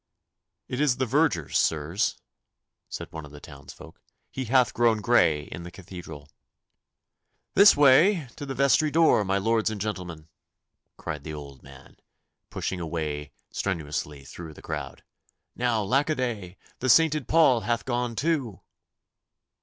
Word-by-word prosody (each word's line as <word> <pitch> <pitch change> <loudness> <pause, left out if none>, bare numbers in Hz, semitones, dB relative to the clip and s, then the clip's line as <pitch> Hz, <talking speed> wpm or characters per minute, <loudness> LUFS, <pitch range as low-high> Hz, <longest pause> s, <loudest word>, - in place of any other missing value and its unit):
'It 125 +2 -3
is 135 -5 +2
the 130 - 0
verger, 130 - +1
sirs,' 80 +5 0 0.7
said - - -7
one 80 -1 -7
of 75 - -12
the 75 - -11
townsfolk. 70 -2 -13 0.3
'He 130 - -4
hath 125 -2 +3
grown 115 -2 +2
grey 100 -10 +3
in 85 - -9
the 85 - -8
Cathedral.' 85 -5 -10 1.3
'This 200 -3 +7
way 145 +4 +5
to 145 - -7
the 135 - -4
vestry 140 +3 +3
door, 160 -8 +4
my 95 0 0
lords 110 +2 +1
and 110 -2 -5
gentlemen,' 90 -6 -5 0.7
cried 75 -4 -6
the 80 0 -6
old 70 -3 -10
man, 65 -1 -16 0.5
pushing 95 - -4
a 85 - -4
way 75 -3 -4 0.2
strenuously 75 -6 -4
through 80 +1 -10
the - - -14
crowd. - - -6 0.5
'Now, 120 -3 0
lack 135 +9 +1
a 155 - +1
day, 105 -9 -4 0.2
the 130 - -1
sainted 155 0 +4
Paul 155 -7 +4
hath 115 +2 -2
gone 120 -2 -2
too! 135 - -1
105 Hz, 145 wpm, -26 LUFS, 80-130 Hz, 1.3 s, This